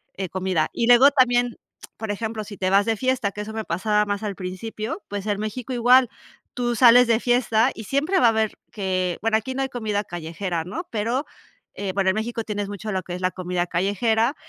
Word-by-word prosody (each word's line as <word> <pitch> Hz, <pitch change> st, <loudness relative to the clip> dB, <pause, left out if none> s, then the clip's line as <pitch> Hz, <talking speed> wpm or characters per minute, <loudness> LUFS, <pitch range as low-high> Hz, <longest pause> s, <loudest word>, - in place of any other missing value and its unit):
eh, 190 Hz, -2 st, -4 dB
comida. 185 Hz, -3 st, 0 dB
Y 230 Hz, -, 0 dB
luego 245 Hz, +4 st, +7 dB
también, 245 Hz, -3 st, +2 dB, 0.4 s
por 220 Hz, -1 st, -4 dB
ejemplo, 220 Hz, +1 st, -4 dB
si 205 Hz, 0 st, -9 dB
te 185 Hz, -, 0 dB
vas 200 Hz, +1 st, +4 dB
de 225 Hz, -, +1 dB
fiesta, 255 Hz, -4 st, 0 dB
que 210 Hz, -, -5 dB
eso 210 Hz, +1 st, -6 dB
me 220 Hz, -1 st, -4 dB
pasaba 210 Hz, +4 st, +1 dB
más 205 Hz, +1 st, -3 dB
al 205 Hz, -2 st, -3 dB
principio, 215 Hz, -, -5 dB
pues, 205 Hz, -1 st, -4 dB
en 205 Hz, -1 st, -1 dB
México 235 Hz, +4 st, -4 dB
igual, 250 Hz, +1 st, +5 dB, 0.4 s
tú 240 Hz, -1 st, -1 dB
sales 245 Hz, +1 st, +7 dB
de 230 Hz, -1 st, +3 dB
fiesta 245 Hz, 0 st, +2 dB
y 220 Hz, -, -7 dB
siempre 305 Hz, -, +1 dB
va 240 Hz, -, +5 dB
a -, -, +7 dB
haber 220 Hz, -1 st, 0 dB, 0.2 s
que, 185 Hz, -3 st, -1 dB
bueno, 225 Hz, +1 st, +1 dB
aquí 260 Hz, +4 st, -5 dB
no 270 Hz, -, -1 dB
hay 270 Hz, -, -3 dB
comida 215 Hz, -5 st, -2 dB
callejera, 170 Hz, 0 st, -4 dB
¿no?, 330 Hz, -, -6 dB
pero, 235 Hz, +6 st, -1 dB, 0.5 s
eh, 200 Hz, -2 st, -3 dB
bueno, 190 Hz, -1 st, +2 dB
en -, -, -4 dB
México 230 Hz, +1 st, -3 dB
tienes 205 Hz, -2 st, -4 dB
mucho 205 Hz, +1 st, -5 dB
lo 190 Hz, -1 st, -1 dB
que 175 Hz, +1 st, -6 dB
es 180 Hz, -, -7 dB
la 185 Hz, 0 st, +1 dB
comida 180 Hz, -1 st, -2 dB
callejera 220 Hz, -, +1 dB
215 Hz, 220 wpm, -23 LUFS, 195-240 Hz, 0.5 s, luego